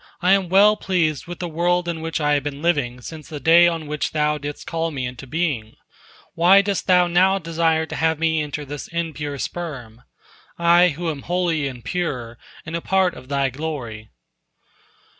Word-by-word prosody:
I 180 - +2
am 195 -2 +3
well 205 +3 +5
pleased 165 -5 -1
with 175 0 -6
the 175 - -4
world 175 +2 0
in 165 -2 -3
which 165 +1 -3
I 150 -1 +2
have 145 - +2
been 145 +1 -6
living 135 -8 0
since 155 +3 -9
the 150 - -6
day 170 +3 +6
on 165 -2 -2
which 150 0 -3
Thou 150 -1 +1
didst 145 +1 -7
call 165 0 -2
me 135 -5 -4
into 125 +2 -7
being. 135 -7 -2 0.6
Why 185 +4 +5
dost 200 -1 -2
Thou 180 -1 +5
now 185 +3 +3
desire 165 -2 0
to - - -7
have 160 -1 +1
me 160 0 +1
enter 150 0 -5
this 145 +1 -7
impure 155 -4 -4
sperm, 130 -9 -6 0.6
I 170 +1 +5
who 165 +1 -2
am 145 -3 -7
holy 170 -4 0
and 125 -4 -9
pure, 125 -10 -3 0.3
and 165 +1 -5
a 170 - -2
part 190 0 +2
of 130 +1 -13
Thy 140 -2 0
glory?" 125 -7 -6
160 Hz, 190 wpm, -22 LUFS, 145-175 Hz, 0.6 s, day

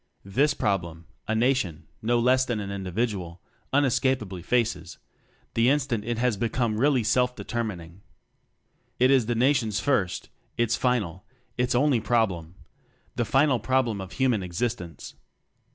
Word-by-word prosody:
This 135 +10 +2
problem 85 -5 -2 0.2
a 110 - 0
Nation 110 - 0 0.2
no 120 +2 +2
less 130 +2 +3
than 120 -4 -2
an 100 -1 -5
individual 95 -2 -3 0.3
unescapably 130 -9 +1
faces, 120 +3 -1 0.6
the 115 +2 +3
instant 135 -6 0
it 120 0 -2
has 120 -2 +1
become 115 0 -1
really 135 -2 +3
self 125 +2 +2
determining. 95 -7 -5 1.0
It 130 +2 +4
is 130 -5 +3
the 120 - 0
Nation's 115 -4 +2
first, 105 -9 0 0.3
its 120 0 +2
final, 105 -8 -1 0.3
its 125 0 0
only 135 -1 +3
problem 95 -8 0 0.6
the 120 - 0
final 135 +2 +3
problem 120 -5 0
of 95 -1 -8
human 125 -2 +1
existence. 90 - -4
115 Hz, 135 wpm, -26 LUFS, 95-125 Hz, 1.0 s, It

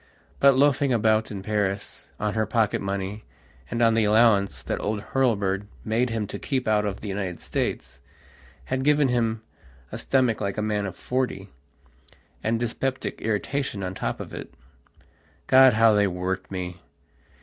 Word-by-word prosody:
But, 140 -1 +6
loafing 140 0 +3
about 110 -2 +2
in 100 -2 -6
Paris, 105 -1 -2
on 105 0 -1
her 110 0 0
pocket 110 -4 +1
money 100 +2 -4 0.5
and 115 - 0
on 115 -1 +5
the 115 0 +3
allowance 105 -2 +3
that - - -3
old 105 0 -1
Hurlbird 105 -7 +1 0.2
made 115 +3 +1
him 115 -2 -2
to 100 - -7
keep 130 -4 -2
out 105 -1 +2
of 100 -1 -4
the 105 - -6
United 95 -3 -3
States, - - -3 0.6
had 130 0 -2
given 145 -1 +3
him 115 -2 0 0.5
a - - -5
stomach 125 -5 +1
like 100 0 -2
a - - 0
man 105 -1 -1
of 90 - -7
forty, 125 -6 -2 0.9
and 115 +1 0
dyspeptic 130 +3 -3
irritation 110 0 -2
on 90 0 -3
top - - -3
of - - -8
it. - - -7 0.9
God, 130 -1 +7
how 115 0 +5
they 105 -1 +3
worked 95 +1 -3
me! 90 -2 -5
110 Hz, 160 wpm, -25 LUFS, 100-120 Hz, 0.9 s, God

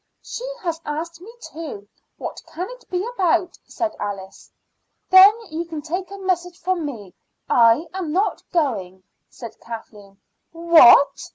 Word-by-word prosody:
"She 480 - -7 0.2
has 335 -2 -3
asked 330 +3 -5
me 420 +5 -11
too. 300 - -9 0.3
What - - -7
can 355 +4 -5
it - - -14
be 365 +2 -2
about?" 360 -4 0
said 335 -2 -3
Alice. 195 -1 -7 0.6
"Then 375 +2 +10 0.2
you 325 +2 -3
can 320 -3 -7
take 360 +4 -4
a 400 - -9
message 360 -2 -2
from 355 -3 -1
me; 210 -10 -9 0.3
I 230 +6 +4
am 370 -5 -4
not 385 +6 0
going," 200 - -2 0.3
said 230 -2 -11
Kathleen. 210 -3 -11 0.3
"What?" 330 -5 +6
330 Hz, 145 wpm, -21 LUFS, 230-360 Hz, 0.6 s, Then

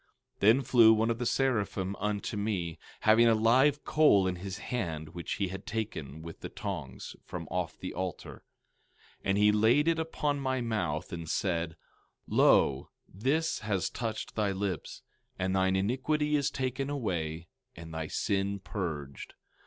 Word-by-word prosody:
16:6 - - -40
Then 110 +7 +5
flew 115 -3 +7
one 110 +1 +2
of 115 - -3
the 120 - 0
seraphim 105 -8 0
unto 105 +1 -2
me, 95 -6 -2 0.2
having 110 +2 +6
a 115 - +5
live 130 +6 +3
coal 150 -11 +5
in 90 -1 -1
his 95 +1 -6
hand, 80 -10 -4
which 85 +1 -5
he 100 -3 -1
had 95 +2 -8
taken 80 -10 -4
with 85 -1 -9
the - - -6
tongs 80 -11 -6
from - - -7
off - - -2
the - - -6
altar; 95 -1 -5 0.8
16:7 - - -39
And 95 0 +2
he 105 0 +5
laid 115 +8 +4
it 165 -1 +2
upon 150 -3 -1
my 130 -1 -1
mouth, 90 -10 -2
and 85 -1 -5
said: 85 -4 -1 0.5
Lo, 70 +1 +4 0.2
this 140 - 0
has 100 -3 -1
touched 115 -2 -4
thy 105 -2 0
lips; 95 -4 -4 0.3
and 95 +1 0
thine 95 0 +2
iniquity 135 +9 +1
is 140 -2 +2
taken 130 +1 -2
away, 85 - -2 0.3
and 80 -1 -9
thy 80 -1 -3
sin 100 +3 -1
purged. 80 -9 -5
100 Hz, 160 wpm, -30 LUFS, 90-120 Hz, 0.8 s, flew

